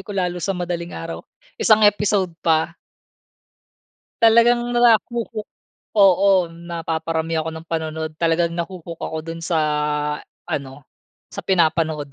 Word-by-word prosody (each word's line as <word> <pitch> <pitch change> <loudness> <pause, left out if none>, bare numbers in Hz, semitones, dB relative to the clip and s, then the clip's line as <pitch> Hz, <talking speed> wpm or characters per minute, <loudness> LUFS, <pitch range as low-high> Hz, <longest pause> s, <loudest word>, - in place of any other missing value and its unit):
ko 200 +2 -8
lalo 180 -1 -1
sa 195 +1 -1
madaling 175 -1 -4
araw, 165 0 -6 0.4
isang 215 -1 +5
episode 205 -3 +2
pa. 160 0 +2 1.5
Talagang 235 +1 +6 0.2
nara 235 -3 +6
ho-hook 230 -3 -5 0.5
oo, 195 -1 +5
napaparami 165 -1 -3
ako 160 - -4
ng 160 - -9
panood. 160 -1 -3
Talagang 170 0 +2
na 170 0 -3
ho-hook 170 -3 -9
ako 160 - -4
dun 165 0 -6
sa 165 0 -1 0.9
ano, 140 0 -5 0.5
sa - - -5
pinapanood 160 -5 +1
170 Hz, 125 wpm, -21 LUFS, 160-195 Hz, 1.5 s, Talagang